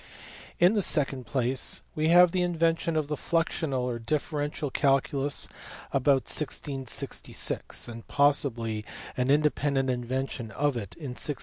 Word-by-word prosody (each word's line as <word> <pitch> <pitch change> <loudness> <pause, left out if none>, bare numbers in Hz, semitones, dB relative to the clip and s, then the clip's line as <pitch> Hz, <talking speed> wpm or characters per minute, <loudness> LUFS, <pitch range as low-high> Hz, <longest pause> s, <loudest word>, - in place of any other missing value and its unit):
In 180 +4 +6
the 210 - +2
second 135 - +2
place, 130 0 0
we 155 0 0
have 175 0 +7
the 185 - 0
invention 165 -1 +1
of 155 -2 0
the 150 - -2
fluxional 160 -3 -1
or 125 -1 -2
differential 145 +2 -2
calculus 140 +1 +1 0.4
about 135 0 +3
1666 135 -5 -2
(and 115 -1 -9
possibly 120 -6 +1 0.3
an 125 0 0
indepen 145 0 +2
dent 135 -1 +1
invention 125 -1 -3
of 145 +4 0
it 100 -5 -6
in 145 -5 -6
1674). 145 +4 -3
140 Hz, 135 wpm, -28 LUFS, 125-155 Hz, 0.4 s, have